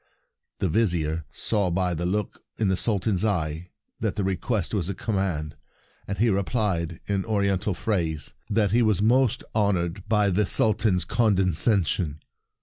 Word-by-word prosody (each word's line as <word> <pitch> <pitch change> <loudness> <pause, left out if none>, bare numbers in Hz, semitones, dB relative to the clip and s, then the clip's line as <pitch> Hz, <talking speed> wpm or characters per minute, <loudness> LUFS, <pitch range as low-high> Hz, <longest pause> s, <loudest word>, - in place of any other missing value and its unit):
The 95 - 0
Vizier 85 -6 0
saw 100 -4 0
by 90 +1 0
the 85 +2 -2
look 105 +2 -2 0.2
in 105 -3 +1
the 95 - +2
Sultan's 100 -1 0
eye 85 -4 -1 0.3
that 110 -3 -1
the 105 - -1
re 95 0 0
quest 105 0 -2
was 95 -4 0
a 100 - -3
command, 95 -9 -2 0.5
and 100 - -3
he 115 +1 +3
replied 95 -5 -1
in 100 -1 -1
Oriental 100 -3 0
phrase 80 -7 -2 0.2
that 105 -1 +2
he 120 +3 +4
was 110 -5 +2
most 120 +3 +3
honored 95 -4 0
by 105 -2 +3
the 100 +2 +1
Sultan's 105 -4 +2
condescension. 95 -6 +1
100 Hz, 150 wpm, -25 LUFS, 85-105 Hz, 0.5 s, he